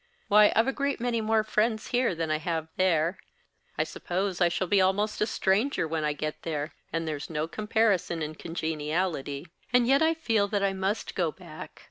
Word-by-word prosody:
Why, 210 0 +7
I've 225 - +5
a 270 - +1
great 280 -1 -1
many 235 -1 0
more 220 0 +2
friends 220 +1 0
here 245 -7 +1
than 165 -1 -2
I 155 - +1
have 160 -1 -3
there; 175 -1 +2 0.6
I - - +3
suppose 185 +1 -3
I 175 - +5
shall 175 +2 -1
be 195 +2 +3
almost 200 +3 +1
a 210 - +3
stranger 210 - +1
when 160 0 -2
I 150 - +1
get 155 +1 -4
there, 150 -2 -3 0.2
and 165 0 -2
there's 150 -2 -4
no 155 -1 -2
comparison 210 -4 +1
in 155 +1 -4
congeniality; 160 -2 -2 0.3
and 245 -1 +4
yet 275 +4 +4
I 320 +1 +3
feel 225 -10 +1
that 200 -1 -1
I 195 -1 +2
must 195 +3 -2
go 170 -4 0
back. 165 -2 -11
185 Hz, 195 wpm, -28 LUFS, 160-220 Hz, 0.6 s, Why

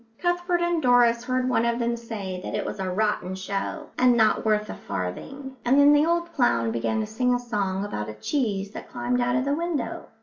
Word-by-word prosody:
Cuthbert 350 0 0
and 345 -1 +1
Doris 245 -2 +4
heard 255 0 0
one 250 -3 +2
of 235 0 +1
them 235 0 0
say 205 -6 -6
that - - -4
it - - -2
was - - -5
a 190 -1 -2
rotten 190 -1 -1
show 200 +11 -4
and 250 -1 +5
not 220 -2 +3
worth 215 -1 +1
a - - -5
farthing; 265 - -6
and 265 +4 +4
then 285 +1 +7
the 295 +2 +4
old 340 0 0
clown 115 -1 +2
began 120 - -1
to - - -2
sing 245 +4 +1
a - - -1
song 205 -5 -2
about 105 - -4
a 105 - -7
cheese 200 - -2
that - - -9
climbed 245 0 -1
out 245 0 +1
of 255 +1 +1
the 280 - +1
window. 305 -7 -3
235 Hz, 225 wpm, -25 LUFS, 200-270 Hz, -, then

